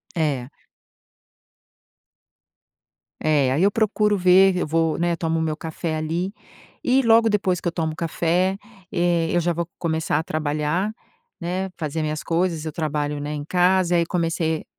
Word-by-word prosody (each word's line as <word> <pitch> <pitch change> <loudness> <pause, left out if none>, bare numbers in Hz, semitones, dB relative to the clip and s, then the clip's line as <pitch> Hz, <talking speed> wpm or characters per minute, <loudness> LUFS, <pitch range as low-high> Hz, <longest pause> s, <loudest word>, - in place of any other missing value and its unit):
É. 140 -7 -1 2.7
É, 145 -4 +2
aí 145 +7 +2
eu 200 - +4
procuro 210 -1 +1
ver, 185 +1 +5
eu 180 - -1
vou 160 0 +1
né, 175 0 +1
tomo 165 -1 -1
meu 160 -1 -1
café 160 +1 -4
ali 165 +5 -2 0.5
e 260 +2 +3
logo 230 -1 +5
depois 195 -4 +1
que - - -3
eu - - +1
tomo 160 -2 -2
café, 175 +3 0 0.3
eh, 170 -1 +1
eu 175 - +3
já 175 0 0
vou 170 0 -3
começar 160 -3 0
a - - -2
trabalhar, 155 +6 -1 0.5
né, 185 +2 -2
fazer 160 -1 -3
minhas 155 0 -3
coisas, 165 -2 0
eu 155 - -3
trabalho, 150 -2 -2
né, 145 +1 -4
em 145 -1 -5
casa, 180 +1 +3
aí 170 -1 +3
comecei 165 -2 -1
165 Hz, 155 wpm, -23 LUFS, 155-180 Hz, 2.7 s, ver